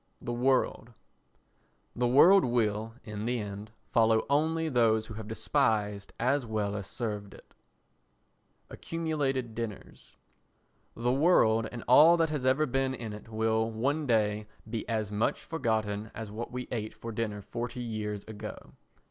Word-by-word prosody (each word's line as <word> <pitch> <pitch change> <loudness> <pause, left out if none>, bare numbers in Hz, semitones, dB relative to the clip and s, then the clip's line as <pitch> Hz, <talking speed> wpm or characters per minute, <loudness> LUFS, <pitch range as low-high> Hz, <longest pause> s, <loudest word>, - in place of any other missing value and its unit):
The 120 - -4
World 125 -1 +1 1.0
The 120 0 +1
world 175 +10 +7
will, 115 -2 0
in 105 -1 -5
the 125 +1 0
end, 105 0 -6 0.2
follow 110 -1 +3
only 160 +3 +2
those 115 -5 +3
who 110 - -8
have 110 0 -7
despised 110 -4 0
as 140 +2 +2
well 105 -3 -2
as 100 -2 -5
served 105 -4 -5
it. - - -18 1.2
Accumulated 145 -7 -2
Dinners 110 - -7 0.8
The 120 +2 0
world 115 -7 +4
and 120 -2 -7
all 155 +7 +8
that 165 -2 +1
has 140 -4 -1
ever 135 +4 +3
been 135 0 0
in 115 -4 -6
it 105 +1 -10
will 110 0 +1
one 140 +7 -1
day 105 -2 +1 0.2
be 110 +1 -4
as 110 -2 -1
much 105 +2 0
forgotten 110 -8 -1
as 110 -2 -6
what 115 +3 -6
we 125 0 -5
ate 110 -3 -4
for 115 - -7
dinner 105 -2 -3
forty 120 +3 -5
years 105 -3 -4
ago. 110 -1 -9
115 Hz, 150 wpm, -30 LUFS, 110-130 Hz, 1.2 s, all